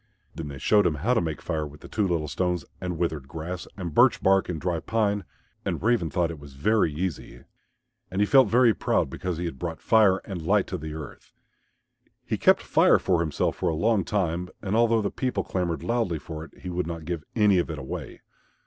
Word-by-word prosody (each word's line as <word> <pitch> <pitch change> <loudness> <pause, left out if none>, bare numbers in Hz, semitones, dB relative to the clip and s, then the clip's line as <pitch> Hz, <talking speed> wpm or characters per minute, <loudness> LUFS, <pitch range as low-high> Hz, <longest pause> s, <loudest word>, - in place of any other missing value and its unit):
Then 80 - -6
they 70 -1 -7
showed 105 +9 +4
him 80 - 0
how 100 - +1
to 115 - +2
make 80 -4 -4
Fire 80 -1 -2
with 75 0 -14
the - - -10
two 105 -3 0
little 85 -4 -1
stones 90 +1 -1 0.2
and 90 -2 -3
withered 80 -5 -2
grass, 85 +4 -6
and 85 -5 -5
birch - - +5
bark 95 0 +3
and 85 -3 -3
dry 90 0 -1
pine, 105 -1 0 0.4
and - - -3
Raven 110 -8 +2
thought 85 0 0
it 80 - -8
was 70 -2 -13
very 105 +4 +2
easy. 75 -6 -5 0.7
And 95 +1 -3
he 105 - +4
felt 130 +2 +6
very 120 0 +5
proud - - 0
because 90 -3 -3
he 90 - -3
had 80 -6 -5
brought 85 -2 -4
Fire 105 -4 +4
and 95 -5 -5
Light 95 +5 +2
to 90 - -5
the 80 0 -6
earth. 80 -2 -10 0.9
He - - -1
kept - - +4
Fire - - +5
for 90 -3 +1
himself 80 -3 -1
for - - 0
a 80 - -1
long 105 +4 +2
time, 90 -2 -1
and 100 0 -2
although 115 -1 +3
the 100 - -1
people 125 -7 -1
clamoured 90 -3 -2
loudly 115 -8 0
for 80 +1 -7
it, - - -14
he 90 - -6
would 90 -1 -2
not 85 -2 -6
give 85 -2 -3
any 105 -4 +4
of 85 - -1
it 80 - -4
away. 65 -2 -7
90 Hz, 220 wpm, -26 LUFS, 80-100 Hz, 0.9 s, felt